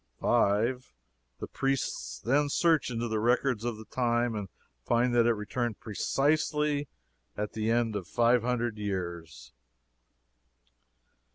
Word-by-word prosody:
"5. 115 - +1 0.4
The - - -5
priests 65 - -2
then 145 - +1
search 160 -2 +2
into 120 -1 -2
the 110 -1 -1
records 120 0 +1
of 120 -2 -2
the 110 - -10
time, 120 +1 0
and 105 -3 -4 0.3
find 120 - +2
that 120 -1 +4
it 120 - +4
returned 110 +2 -3
precisely 150 +5 0 0.5
at 105 0 -3
the 110 0 -1
end 115 -2 +1
of 95 -4 -4
five 120 +7 +3
hundred 120 -2 -1
years." 85 -10 -5
120 Hz, 125 wpm, -29 LUFS, 105-125 Hz, 0.5 s, that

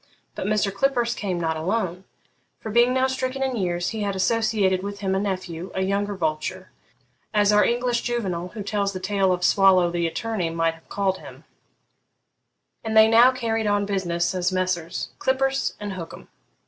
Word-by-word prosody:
But - - -4
Mr. 210 -1 +1
Clippurse 240 +1 +1
came 185 -4 -3
not 160 -1 -1
alone; 185 +1 -2 0.5
for, 220 - -6
being 240 +3 +4
now 260 0 +2
stricken 260 0 -2
in 260 -1 -1
years, 175 -4 -1
he 220 -1 -4
had 200 -1 -1
associated 200 -2 +1
with 200 +1 -6
him 190 -1 0
a 190 - +1
nephew, 185 -3 -4
a 190 - 0
younger 200 +1 -1
vulture 155 -4 -3 0.6
(as 205 0 +4
our 210 - +5
English 240 0 +1
Juvenal, 190 -8 -2
who 205 +3 -7
tells 200 0 -1
the 185 - -4
tale 195 0 +1
of 180 0 -1
Swallow 185 -2 +4
the 170 -1 0
attorney, 200 0 -2
might 165 0 0
have 165 - -20
called 195 -2 -1
him), - - -12 1.4
and 220 -1 0
they 220 0 +8
now 235 +3 +6
carried 225 -4 -1
on 205 0 +1
business 175 -4 -1
as 180 0 0
Messrs. 185 -2 -2
Clippurse 270 +1 0
and 205 -2 -5
Hookem. 170 -3 -9
200 Hz, 175 wpm, -24 LUFS, 180-225 Hz, 1.4 s, they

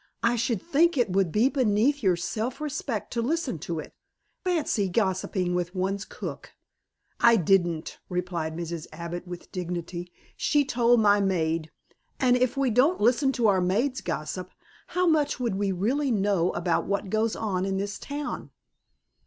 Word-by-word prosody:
"I 235 +1 +3
should 235 -3 -1
think 335 0 +3
it 240 -6 +2
would 190 -3 +2
be 220 +7 +4
beneath 260 +1 +2
your 190 -5 +3
self 215 +8 -3
respect 275 -6 -3
to 235 - 0
listen 275 - -1
to 165 +3 -4
it. 155 - -7 0.5
Fancy 310 - 0
gossiping 185 -2 0
with 180 +1 -2
one's 195 +2 -1
cook." - - -7 0.7
"I 235 0 +6
didn't," 175 -4 +1
replied 175 -3 -2
Mrs. 170 -2 -5
Abbott 170 +2 -6
with 175 -1 -9
dignity. 175 0 -5 0.2
"She 290 -2 +2
told 240 -2 +3
my 205 -1 +5
maid, 165 -4 0 0.5
and 250 -2 +4
if 250 +1 +1
we 270 -3 +2
didn't 275 +11 +3
listen 255 +5 +3
to 240 -4 +2
our 190 -3 +3
maids' 230 +9 0
gossip 175 +2 -4 0.4
how 360 0 0
much 310 -5 +2
would 240 -5 0
we 195 0 0
really 250 +10 0
know 195 -5 +2
about 170 -1 0
what 200 -1 -2
goes 220 +1 +1
on 195 -4 -1
in 195 0 -1
this 200 +1 -3
town?" 290 +1 -5
200 Hz, 160 wpm, -27 LUFS, 180-250 Hz, 0.7 s, I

